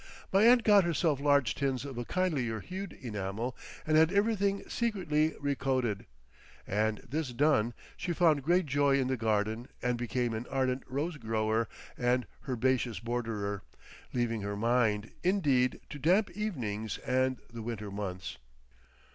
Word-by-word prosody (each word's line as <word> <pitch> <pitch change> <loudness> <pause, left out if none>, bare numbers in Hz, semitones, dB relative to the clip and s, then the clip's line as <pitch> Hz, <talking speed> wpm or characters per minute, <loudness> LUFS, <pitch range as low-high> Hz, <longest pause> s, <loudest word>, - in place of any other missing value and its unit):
My 195 - +5
aunt 240 -1 +6
got 205 -3 +6
herself 160 -3 +1
large 140 -5 +3
tins 135 -1 -1
of 135 -2 -6
a 120 0 -4
kindlier 140 -12 0
hued 190 - -6
enamel 110 +1 -4 0.3
and 155 0 +3
had 160 +2 +5
everything 200 -1 +1
secretly 170 -10 0
recoated, 130 -6 0 0.6
and 105 +1 0
this 150 +2 -2
done, 120 -4 +2 0.2
she 175 - -3
found 165 -4 +3
great 175 +5 +2
joy 140 -1 +3
in 130 -1 0
the 130 - +1
garden 110 +1 0
and 125 -1 -1
became 120 0 -1
an 110 +2 -4
ardent 130 -1 0
rose 145 +5 -2
grower 110 -1 0 0.3
and 125 0 +2 0.2
herbaceous 125 -1 +1
borderer, 110 -4 -3 0.5
leaving 115 -3 -1
her 100 0 -3
Mind, 110 -2 +1
indeed, 145 -10 +2
to 145 - -6
damp 180 +8 +3
evenings 120 - -3
and 130 0 +1 0.2
the 115 - -6
winter 110 -3 -5
months. 95 -5 -5
130 Hz, 145 wpm, -31 LUFS, 115-155 Hz, 0.6 s, aunt